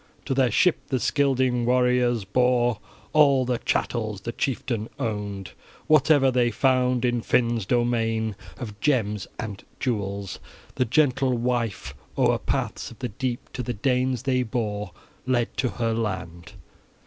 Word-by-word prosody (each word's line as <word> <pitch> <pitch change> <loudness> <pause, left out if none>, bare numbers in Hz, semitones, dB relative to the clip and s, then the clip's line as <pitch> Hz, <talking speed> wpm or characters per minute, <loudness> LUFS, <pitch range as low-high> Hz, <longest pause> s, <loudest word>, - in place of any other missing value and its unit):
To 135 - -1
their 130 -2 +3
ship 180 - +3
the 130 - 0
Scylding 130 -4 +1
warriors 125 -2 +2
bore 120 +1 +2 0.3
all 140 -4 +5
the 125 -1 -1
chattels 110 -4 -1
the 115 - -4
chieftain 120 -4 -2
owned, 100 -4 -4 0.3
whatever 145 -3 +5
they 120 -1 +2
found 125 +1 +2
in 120 -1 +1
Finn's 115 -4 +1
domain 115 -2 +1 0.2
of 105 -5 -7
gems 105 -8 0
and 105 -3 -6 0.2
jewels. 100 -5 -3 0.3
The 130 - +1
gentle 130 -1 +2
wife 120 -3 -2 0.2
o'er - - +3
paths - - -2
of 115 - -13
the 125 -2 -4
deep 120 +3 -4
to 125 - -3
the 120 0 -3
Danes 125 +2 0
they 130 -1 +1
bore, 105 -4 -3 0.4
led 120 -2 0
to 125 - +1
her 115 -1 -1
land. 90 -6 -4
120 Hz, 140 wpm, -25 LUFS, 110-130 Hz, 0.4 s, all